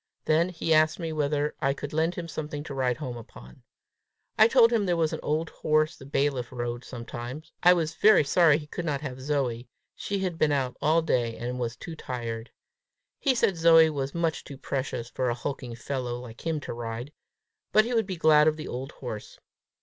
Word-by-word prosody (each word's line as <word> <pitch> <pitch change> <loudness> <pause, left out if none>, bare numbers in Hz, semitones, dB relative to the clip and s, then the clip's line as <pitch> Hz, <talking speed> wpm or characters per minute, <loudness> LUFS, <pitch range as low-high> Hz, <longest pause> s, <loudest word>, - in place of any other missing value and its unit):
Then 165 +3 +3
he 165 -2 0
asked 155 0 +4
me 165 -3 -4
whether 150 0 0
I 135 0 +1
could 145 +1 -7
lend 160 +3 +1
him 170 -1 -5
something 150 -2 -5
to 145 - -7
ride 130 -2 0
home 130 -6 -5
upon. 65 - -13 0.7
I 220 - +7
told 235 -1 +5
him 210 -4 +2
there 175 -1 +1
was 160 -2 +1
an - - -3
old 155 +2 -1
horse 155 +2 +1
the 135 - -13
bailiff 135 -3 0
rode 120 -1 -4
sometimes; 120 +4 -7
I 180 +1 +7
was 165 -3 -1
very 210 -5 +5
sorry 155 +1 +4
he 150 - -8
could 160 +4 -5
not 150 -4 -2
have 130 -3 -6
Zoe: 130 -4 -1 0.3
she 200 - -3
had 185 -4 -3
been 155 - +3
out 130 -3 0
all 160 +2 +3
day 120 -7 0
and 125 +1 -4
was 120 -1 -2
too 165 +8 -8
tired! 115 -5 -5 0.7
He 270 -3 +2
said 195 -6 +2
Zoe 165 -1 +6
was 140 -1 -3
much 165 -2 -1
too 140 - -10
precious 130 -3 -3
for 125 +1 -1
a 120 - 0
hulking 125 -1 -5
fellow 125 0 -3
like 125 +4 -9
him 160 -2 0
to - - -5
ride, 120 +4 -6 0.6
but 215 +1 +5
he 245 - -2
would 225 -4 +1
be 185 -3 -4
glad 155 -1 +5
of 155 0 +2
the 155 - -6
old 130 +4 -5
horse. 110 -5 -7
145 Hz, 210 wpm, -27 LUFS, 125-165 Hz, 0.7 s, I